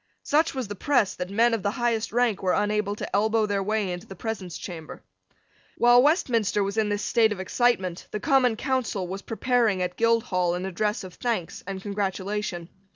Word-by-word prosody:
Such 310 Hz, 0 st, +2 dB
was 260 Hz, -4 st, -3 dB
the 205 Hz, -, -5 dB
press, 240 Hz, -1 st, +1 dB
that 180 Hz, 0 st, -5 dB
men 230 Hz, +4 st, +3 dB
of 225 Hz, -, 0 dB
the 200 Hz, -, 0 dB
highest 230 Hz, -1 st, -1 dB
rank 235 Hz, -4 st, +1 dB
were 185 Hz, -2 st, +1 dB
unable 210 Hz, 0 st, 0 dB
to -, -, -4 dB
elbow 220 Hz, +2 st, +2 dB
their 200 Hz, -1 st, -1 dB
way 210 Hz, -1 st, -1 dB
into 175 Hz, +1 st, -6 dB
the 195 Hz, -, -9 dB
presence 190 Hz, -5 st, -5 dB
chamber. 165 Hz, -4 st, -8 dB, 0.7 s
While 240 Hz, +1 st, +6 dB
Westminster 235 Hz, -, +2 dB
was 200 Hz, +1 st, -3 dB
in 220 Hz, -1 st, +1 dB
this 205 Hz, 0 st, -1 dB
state 225 Hz, -2 st, +3 dB
of 205 Hz, -, -3 dB
excitement, 190 Hz, -3 st, 0 dB
the 210 Hz, -, -4 dB
Common 260 Hz, -3 st, +3 dB
Council 235 Hz, -7 st, -1 dB
was 190 Hz, +2 st, -5 dB
preparing 230 Hz, -3 st, +1 dB
at 180 Hz, 0 st, -4 dB
Guildhall 190 Hz, -7 st, +2 dB
an 180 Hz, +1 st, -4 dB
address 210 Hz, +3 st, -1 dB
of 185 Hz, -2 st, -9 dB
thanks 230 Hz, -9 st, -3 dB
and 195 Hz, -1 st, -5 dB
congratulation. 200 Hz, -3 st, -3 dB
210 Hz, 190 wpm, -26 LUFS, 190-230 Hz, 0.7 s, While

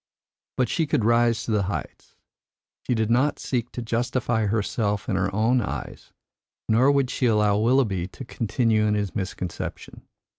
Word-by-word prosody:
But 125 Hz, -, +2 dB
she 165 Hz, -3 st, 0 dB
could 115 Hz, -6 st, +1 dB
rise 115 Hz, 0 st, +3 dB
to -, -, -4 dB
the 105 Hz, -2 st, +2 dB
heights. -, -, -6 dB, 0.7 s
She 125 Hz, -, +2 dB
did 110 Hz, 0 st, 0 dB
not 130 Hz, +5 st, +2 dB
seek 120 Hz, -2 st, -3 dB
to 120 Hz, -, -5 dB
justify 115 Hz, -1 st, 0 dB
herself 105 Hz, 0 st, -1 dB
in 100 Hz, -, 0 dB
her 95 Hz, +1 st, +1 dB
own 115 Hz, +5 st, +2 dB
eyes, -, -, -6 dB, 0.6 s
nor 125 Hz, +5 st, +4 dB
would 140 Hz, -3 st, +1 dB
she 125 Hz, -, 0 dB
allow 105 Hz, -2 st, +3 dB
Willoughby 110 Hz, -6 st, +2 dB
to 130 Hz, +7 st, -10 dB
continue 115 Hz, -2 st, +1 dB
in 105 Hz, -, +2 dB
his 105 Hz, -2 st, -2 dB
misconception. 95 Hz, -3 st, -5 dB
115 Hz, 160 wpm, -24 LUFS, 105-125 Hz, 0.7 s, nor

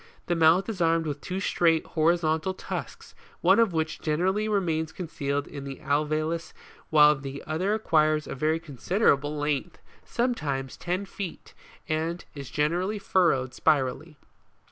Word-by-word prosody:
The 175 Hz, -, 0 dB
mouth 165 Hz, +3 st, +4 dB
is 210 Hz, -6 st, -4 dB
armed 165 Hz, 0 st, +3 dB
with 145 Hz, -2 st, -4 dB
two 185 Hz, +1 st, -4 dB
straight, 165 Hz, -4 st, +2 dB
horizontal 160 Hz, +2 st, +1 dB
tusks, -, -, -6 dB, 0.3 s
one 190 Hz, +5 st, +5 dB
of 230 Hz, -4 st, +4 dB
which 160 Hz, -1 st, -2 dB
generally 190 Hz, +7 st, 0 dB
re 205 Hz, -2 st, +3 dB
mains 160 Hz, -3 st, -1 dB
concealed 145 Hz, -5 st, -3 dB
in 140 Hz, -2 st, -8 dB
the 135 Hz, -1 st, -6 dB
alveolus 155 Hz, +4 st, -1 dB, 0.4 s
while 150 Hz, -1 st, +6 dB
the 135 Hz, 0 st, -7 dB
other 185 Hz, +7 st, 0 dB
acquires 155 Hz, -7 st, +2 dB
a -, -, -5 dB
very 155 Hz, +4 st, 0 dB
considerable 150 Hz, -, +1 dB
length, 150 Hz, +3 st, -2 dB, 0.3 s
sometimes 145 Hz, -, -2 dB
ten 180 Hz, +3 st, -3 dB
feet, 195 Hz, -2 st, -7 dB, 0.3 s
and 160 Hz, +3 st, -2 dB
is 140 Hz, -3 st, -8 dB
generally 175 Hz, +8 st, 0 dB
furrowed 165 Hz, -10 st, +1 dB
spirally. 150 Hz, +2 st, 0 dB
160 Hz, 145 wpm, -27 LUFS, 150-180 Hz, 0.4 s, while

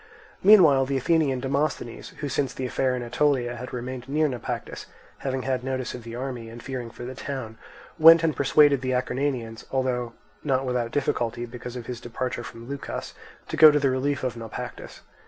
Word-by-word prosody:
Meanwhile 165 Hz, -10 st, +7 dB
the 135 Hz, 0 st, 0 dB
Athenian 140 Hz, -2 st, +1 dB
Demosthenes, 140 Hz, -3 st, -2 dB
who 145 Hz, -, -2 dB
since 135 Hz, -1 st, -1 dB
the 130 Hz, -, -3 dB
affair 130 Hz, 0 st, 0 dB
in 125 Hz, -, -4 dB
Aetolia 120 Hz, -1 st, +1 dB
had 125 Hz, +1 st, -7 dB
remained 125 Hz, +1 st, -6 dB
near 155 Hz, +2 st, +2 dB
Naupactus, 125 Hz, -5 st, -5 dB, 0.3 s
having 130 Hz, -1 st, -2 dB
had 130 Hz, -1 st, -1 dB
notice 130 Hz, -1 st, -3 dB
of 125 Hz, -, -7 dB
the 115 Hz, 0 st, -8 dB
army 125 Hz, -3 st, -5 dB
and 115 Hz, +1 st, -10 dB
fearing 125 Hz, -3 st, -5 dB
for 120 Hz, -, -9 dB
the 130 Hz, -, -6 dB
town, 130 Hz, -4 st, -6 dB, 0.4 s
went 165 Hz, +1 st, +9 dB
and 160 Hz, -2 st, +1 dB
persuaded 140 Hz, 0 st, +4 dB
the 130 Hz, 0 st, -1 dB
Acarnanians, 125 Hz, -3 st, -2 dB
although 125 Hz, -3 st, -1 dB, 0.3 s
not 135 Hz, -2 st, +1 dB
without 125 Hz, -2 st, -1 dB
difficulty 120 Hz, -3 st, -1 dB
because 125 Hz, +1 st, -8 dB
of 120 Hz, -2 st, -6 dB
his 125 Hz, -1 st, -6 dB
departure 120 Hz, 0 st, -4 dB
from 115 Hz, 0 st, -10 dB
Leucas, 140 Hz, +1 st, -5 dB, 0.3 s
to -, -, -4 dB
go 155 Hz, -, +10 dB
to 150 Hz, -, +3 dB
the 140 Hz, -2 st, +2 dB
relief 135 Hz, +1 st, -1 dB
of 125 Hz, -2 st, -1 dB
Naupactus. 115 Hz, -2 st, -8 dB
130 Hz, 185 wpm, -25 LUFS, 120-140 Hz, 0.4 s, go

